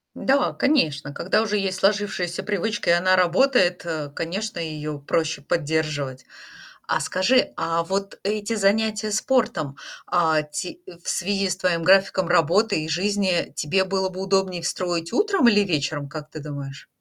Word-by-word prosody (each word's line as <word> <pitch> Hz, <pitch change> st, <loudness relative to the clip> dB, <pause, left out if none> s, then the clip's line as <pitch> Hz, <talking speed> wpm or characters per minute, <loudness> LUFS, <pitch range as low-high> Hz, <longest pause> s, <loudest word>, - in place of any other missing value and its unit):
Да, 270 Hz, 0 st, +1 dB
конечно. 155 Hz, -, +1 dB
Когда 185 Hz, +8 st, +1 dB
уже 210 Hz, -1 st, 0 dB
есть 190 Hz, -2 st, -2 dB
сложившаяся 195 Hz, -3 st, 0 dB
привычка 210 Hz, +1 st, -2 dB
и -, -, +6 dB
она 185 Hz, +2 st, +3 dB
работает, 185 Hz, 0 st, +3 dB
э, 155 Hz, -3 st, -3 dB
конечно, 195 Hz, +5 st, -4 dB
ее 155 Hz, -2 st, -4 dB
проще 155 Hz, +1 st, -1 dB
поддерживать. 145 Hz, -4 st, -2 dB, 0.6 s
А -, -, +1 dB
скажи, 235 Hz, +8 st, +2 dB
а 165 Hz, 0 st, 0 dB
вот 195 Hz, +3 st, -3 dB
эти 210 Hz, +2 st, -2 dB
занятия 215 Hz, +1 st, +1 dB
спортом, 205 Hz, -, 0 dB, 0.3 s
а, 160 Hz, -3 st, +2 dB
ти 175 Hz, -, -6 dB
э, -, -, -10 dB
в -, -, -9 dB
связи 195 Hz, +1 st, 0 dB
с 185 Hz, -, -1 dB
твоим 180 Hz, -3 st, 0 dB
графиком 190 Hz, 0 st, +4 dB
работы 175 Hz, +2 st, +3 dB
и 155 Hz, -, -5 dB
жизни 185 Hz, +1 st, 0 dB
тебе 190 Hz, +6 st, +1 dB
было 190 Hz, 0 st, -1 dB
бы 185 Hz, 0 st, -8 dB
удобнее 190 Hz, -2 st, 0 dB
строить 175 Hz, 0 st, -2 dB
утром 390 Hz, -, +3 dB
или 205 Hz, -3 st, +5 dB
вечером, 145 Hz, -6 st, -1 dB
как 150 Hz, 0 st, -8 dB
ты 155 Hz, -, -8 dB
думаешь? 140 Hz, -1 st, -8 dB
180 Hz, 155 wpm, -23 LUFS, 160-205 Hz, 0.6 s, и